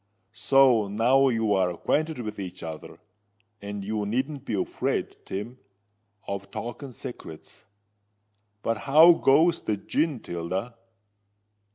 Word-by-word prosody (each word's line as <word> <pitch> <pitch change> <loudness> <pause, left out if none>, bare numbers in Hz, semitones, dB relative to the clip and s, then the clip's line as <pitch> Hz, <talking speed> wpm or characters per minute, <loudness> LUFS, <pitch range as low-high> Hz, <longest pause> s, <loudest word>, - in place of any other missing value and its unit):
So 130 -6 +4
now 120 +7 +3
you're 105 -6 +1
acquainted 155 - -1
with 105 -2 -6
each 95 -2 -7
other; 80 -1 -8 0.6
and 100 -1 -6
you 105 0 -2
needn't 135 +5 -2
be 110 - -2
afraid, 95 - -2
Tim, 115 +6 -6 0.7
of 100 0 -5
talking 120 +6 -7
secrets. 120 - -10 1.0
But 115 -1 0
how 155 +7 +7
goes 165 +3 +3
the 105 - -2
gin, 150 +7 -1
Tilda?" 90 +6 -4
115 Hz, 110 wpm, -26 LUFS, 100-135 Hz, 1.0 s, how